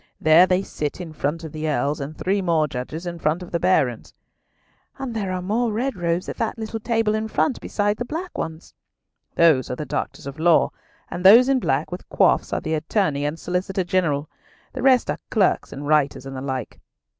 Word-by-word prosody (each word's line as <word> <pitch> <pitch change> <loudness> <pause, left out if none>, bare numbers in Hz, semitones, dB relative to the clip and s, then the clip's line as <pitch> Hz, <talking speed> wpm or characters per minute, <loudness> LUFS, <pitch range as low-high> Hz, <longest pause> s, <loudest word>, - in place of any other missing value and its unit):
There 160 +4 +6
they 185 +1 +2
sit 150 -4 -4
in 170 -3 -7
front 155 +3 -2
of 160 - -7
the 155 +1 -3
Earls, 145 +1 0
and 145 +3 -6
three 195 +2 0
more 165 -4 +2
judges 145 +6 -6
in 170 -1 -5
front 160 +3 0
of 180 - -11
the 170 - 0
Barons." 140 -11 +1 0.8
"And 265 -3 -5
there 200 -4 -2
are 180 -1 -3
more 225 +5 0
red 240 +4 -1
robes 175 0 -1
at - - -5
that 225 +1 -2
little 225 0 -4
table 225 -1 0
in 215 0 -1
front, 250 +4 0
besides 205 0 -1
the 245 - -2
black 330 +7 -5
ones." 160 +1 -6 0.6
"Those 160 -6 +4
are 125 - -2
Doctors 150 -1 -4
of 140 +2 -7
Law, 170 0 +4 0.4
and 180 - -5
those 230 +7 +8
in 270 -1 +3
black 140 - -1
with 180 - -8
coifs 190 - +2
are - - -1
the 160 - -3
Attorney 155 -2 0
and 150 +2 -2
Solicitor 185 +1 -2
General. 170 -6 0 0.5
The - - -5
rest 260 -2 +4
are - - -5
clerks 205 -4 +1
and 140 +1 -7
writers 145 -3 +1
and 135 0 -7
the 130 - -5
like." 130 -3 -5
175 Hz, 205 wpm, -23 LUFS, 150-205 Hz, 0.8 s, those